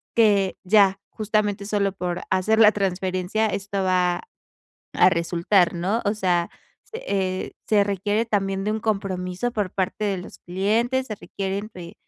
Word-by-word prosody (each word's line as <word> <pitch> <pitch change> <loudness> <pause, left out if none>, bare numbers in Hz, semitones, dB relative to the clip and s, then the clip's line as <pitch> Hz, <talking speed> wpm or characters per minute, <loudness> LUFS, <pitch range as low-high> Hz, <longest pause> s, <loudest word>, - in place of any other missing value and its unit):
que 205 -4 +3
ya, 195 0 +4
justamente, 210 -2 -1
solo 200 -1 0
por 180 -2 -3
hacer 190 +4 +2
la 215 -1 +8
transferencia 190 +1 -1
esto 200 -1 -3
va 180 -1 +1 0.7
a 180 - +6
resultar", 175 +1 +2
¿no? 190 +7 -1
O 205 - +2
sea, 180 -4 +1 0.3
se 455 - -8
eh, 185 -1 -1
se 210 -2 +4
requiere 205 +3 0
también 195 -3 -1
de 210 - +1
un 220 - -2
compromiso 195 0 -2
por 210 -5 -2
parte 190 +2 -2
de 200 -2 0
los 180 - -10
clientes, 225 +8 0
se 215 - -4
requieren, 200 +2 -5
eh, 170 -2 -9
195 Hz, 155 wpm, -23 LUFS, 185-210 Hz, 0.7 s, la